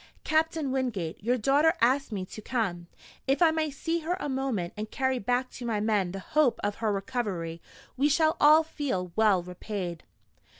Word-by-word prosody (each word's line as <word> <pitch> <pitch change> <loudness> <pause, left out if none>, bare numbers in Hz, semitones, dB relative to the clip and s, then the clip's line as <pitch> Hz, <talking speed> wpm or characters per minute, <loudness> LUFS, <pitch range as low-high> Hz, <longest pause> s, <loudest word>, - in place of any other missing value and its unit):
Captain 315 -2 +1
Wingate, 215 -11 -2
your 245 +3 +2
daughter 285 - +3
asked 260 +2 +2
me 195 -3 -3
to 215 - -10
come. 195 -8 -2 0.4
If 270 +1 +2
I 335 -2 +5
may 315 -1 0
see 325 +4 -2
her 340 +3 -2
a 295 - -3
moment, 260 -10 -2
and 215 +1 -5
carry 260 0 0
back 245 +4 -1
to 250 - -9
my 220 -3 0
men 205 -4 +1
the 195 - -5
hope 270 +6 +1
of 205 0 -1
her 220 -2 0
recovery, 195 -6 -3 0.3
we 280 +3 +2
shall 315 +2 +3
all 305 +2 +7
feel 260 - -3
well 210 -5 +3
repaid." 180 -1 -5
245 Hz, 180 wpm, -28 LUFS, 195-290 Hz, 0.4 s, all